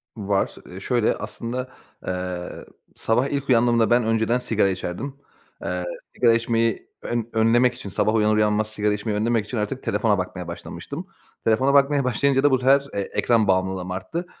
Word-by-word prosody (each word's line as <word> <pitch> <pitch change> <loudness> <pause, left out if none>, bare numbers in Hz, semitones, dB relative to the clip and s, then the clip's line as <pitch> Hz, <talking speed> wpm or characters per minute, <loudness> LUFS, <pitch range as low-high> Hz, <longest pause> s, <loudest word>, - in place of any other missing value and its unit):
Var. 100 -3 -1
Iıı, 95 +2 -9
şöyle, 120 -1 +1
aslında, 120 +4 -5 0.4
ııı, 90 -1 -4 0.3
sabah 120 +4 +1
ilk 140 -1 -3
uyandığımda 120 -2 +4
ben 120 0 +4
önceden 115 +2 +1
sigara 110 -5 +1
içerdim. 95 +8 -4 0.5
Eee, - - -2 0.3
sigara 120 -2 +4
içmeyi 115 -1 0
ön 120 -1 -3
önlemek 120 +3 +4
için, 105 - -8
sabah 110 +3 +1
uyanır 110 -1 +3
uyanmaz 105 0 +2
sigara 105 -1 0
içmeyi 105 0 -2
önlemek 110 0 +1
için 120 - -5
artık 110 +5 -3
telefona 105 -4 +1
bakmaya 90 -1 -4
başlamıştım. 85 - -7 0.4
Telefona 130 +5 +3
bakmaya 140 0 +4
başlayınca 135 +2 +2
da 145 - +5
bu 130 - +4
sefer, 135 +2 +4
eee, 100 -1 -2
ekran 115 -3 +2
bağımlılığım 95 -1 0
arttı. 160 - -4
115 Hz, 165 wpm, -23 LUFS, 105-125 Hz, 0.5 s, da